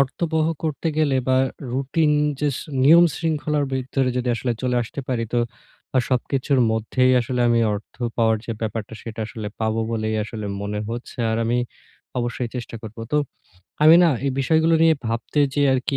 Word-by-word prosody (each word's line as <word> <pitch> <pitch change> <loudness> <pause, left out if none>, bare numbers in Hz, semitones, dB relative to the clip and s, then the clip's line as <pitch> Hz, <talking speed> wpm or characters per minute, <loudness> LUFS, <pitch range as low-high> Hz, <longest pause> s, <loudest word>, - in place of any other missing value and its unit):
অর্থবহ 155 +3 0 0.2
করতে 160 +1 -2
গেলে 145 -4 +2
বা 130 - +4 0.4
রুটিন 145 +4 +1 0.3
যে 150 - +2
শ - - -5 0.2
নিয়ম 170 +5 +8
শৃঙ্খলার 150 -2 -1
বিরুদ্ধর 130 +1 -1
যদি 125 0 -1
আসলে 120 +1 -1
চলে 125 -1 0
আসতে 120 +4 -6
পারি 120 -3 0
তো 120 - +2 0.6
আ - - +6
সবকিছুর 130 +1 +1
মধ্যেই 125 +4 +2
আসলে 125 +1 -2
আমি 115 0 +3
অর্থ 100 - -8 0.2
পাওয়ার 110 -1 +3
যে 115 - -2
ব্যাপারটা 110 -1 -4
সেটা 115 -1 -7
আসলে 110 -1 -7
পাবো 110 0 0
বলেই 110 -1 -1
আসলে 110 -1 -6 0.2
মনে 105 +1 -3
হচ্ছে। 120 +2 -7
আর 110 - 0
আমি 120 +2 +1 0.6
অবশ্যই 120 0 -2
চেষ্টা 120 -1 -6
করব। 110 -1 -9 0.2
তো 150 - +4 0.7
আমি 160 +2 +9
না - - +5 0.2
এই 135 - +1
বিষয়গুলো 160 +4 +3
নিয়ে 165 -1 +6
ভাবতে 115 +6 -1
যেয়ে 145 -1 +3
আরকি 135 +2 -1
125 Hz, 175 wpm, -22 LUFS, 115-145 Hz, 0.7 s, আমি